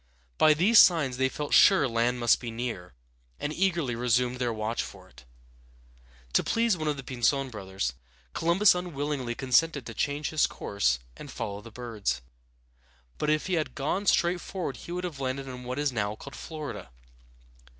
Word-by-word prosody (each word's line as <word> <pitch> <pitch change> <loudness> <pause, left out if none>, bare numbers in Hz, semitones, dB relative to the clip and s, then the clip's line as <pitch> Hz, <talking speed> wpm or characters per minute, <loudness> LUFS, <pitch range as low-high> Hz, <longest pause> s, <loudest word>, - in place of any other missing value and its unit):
By 155 -1 +6
these 205 +8 +6
signs 150 -8 +5
they 130 0 +2
felt 145 +2 -4
sure 185 -8 +6
land 120 +1 0
must 120 -1 +4
be 120 - -6
near, 115 - -5 0.4
and 145 - -3
eagerly 170 -8 0
resumed 125 +1 +1
their 125 -2 -1
watch 110 +1 -2
for - - -10
it. 60 +1 -18 1.1
To - - +3
please 230 -2 +2
one 155 -2 -4
of 150 -1 0
the 135 - -7
Pinzon 130 +2 0
brothers, 95 - -3 0.4
Columbus 175 +5 +4
unwillingly 145 -8 -3
consented 135 +2 +2
to 115 - -7
change 145 +5 -2
his 155 - +3
course 65 -12 0 0.2
and - - -10
follow 100 0 -5
the 115 - -11
birds; 110 - -3 1.0
but 150 - 0
if 155 0 +1
he 185 - -2
had 160 -3 -1
gone 185 +9 -2
straight 175 0 +3
on 175 -7 -2
he 150 - -10
would 180 +1 -3
have 165 -6 -5
landed 135 0 -3
in 125 -1 -8
what 125 +2 -4
is 145 -1 0
now 105 -3 -2
called 140 +5 -11
Flor´i 155 -2 -6
da. - - -9
135 Hz, 180 wpm, -28 LUFS, 120-155 Hz, 1.1 s, By